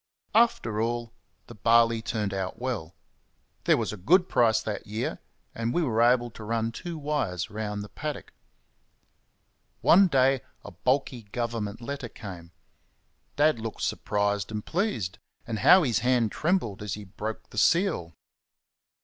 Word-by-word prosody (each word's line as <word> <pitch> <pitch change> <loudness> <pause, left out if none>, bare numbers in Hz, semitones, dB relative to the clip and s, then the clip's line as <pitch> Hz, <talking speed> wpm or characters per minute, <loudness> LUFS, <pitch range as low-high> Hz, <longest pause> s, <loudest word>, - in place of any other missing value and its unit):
After 165 - +3
all, 120 0 -2 0.3
the - - -11
barley 115 +1 +4
turned 105 -3 -2
out 95 0 -3
well 120 -11 -4 0.7
there - - +5
was - - -2
a - - -7
good 180 - +4
price 115 -6 +3
that 105 -2 -5
year, 110 +3 -3 0.3
and 115 +1 -2
we 175 - +2
were 115 -6 +1
able 120 0 +3
to 110 - -10
run 115 +1 -1
two 170 +7 -6
wires 140 - -2
round 105 -1 -4
the 105 - -10
paddock. 150 -2 -6 1.5
One 195 +3 +6
day 135 -4 +3 0.2
a 105 - -8
bulky 125 - -1
Government 115 -3 -3
letter 135 0 -5
came. 90 -7 -9 0.9
Dad 150 -4 +3
looked 110 0 -5
surprised 100 -1 0
and 105 -1 -5
pleased, 160 - -2 0.3
and 110 -2 -3
how 180 +6 +7
his 120 -7 +1
hand 120 -2 +2
trembled 155 - 0
as 105 -3 -3
he 105 - -8
broke 105 +3 -6
the 105 - -2
seal! 165 - +2
115 Hz, 150 wpm, -27 LUFS, 105-135 Hz, 1.5 s, how